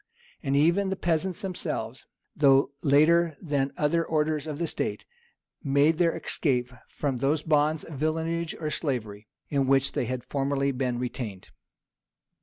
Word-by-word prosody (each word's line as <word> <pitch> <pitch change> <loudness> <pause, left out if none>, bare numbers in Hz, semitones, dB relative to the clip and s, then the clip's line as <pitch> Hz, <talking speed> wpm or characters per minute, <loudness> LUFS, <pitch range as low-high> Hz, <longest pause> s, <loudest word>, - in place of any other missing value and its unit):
And 135 -2 -1
even 170 +7 +3
the 190 - -1
peasants 180 +3 -1
themselves, 185 -2 -4 0.3
though 140 -1 +4
later 155 +2 +4
than 140 -4 -1
other 160 +3 +2
orders 155 -1 0
of 150 -2 -4
the 170 - -1
state, 160 - -3 0.6
made 145 +3 +3
their 170 -2 +2
escape 125 -4 0 0.2
from 140 -4 -2
those 145 +4 0
bonds 150 0 +2
of 145 -5 -9
villenage 165 +2 -1
or 155 -2 -3
slavery 110 -9 -3 0.2
in 140 -2 +1
which 135 0 +3
they - - -1
had 125 +1 -4
formerly 140 0 0
been 125 -2 -2
retained. 120 -6 -5
145 Hz, 145 wpm, -27 LUFS, 135-160 Hz, 0.6 s, though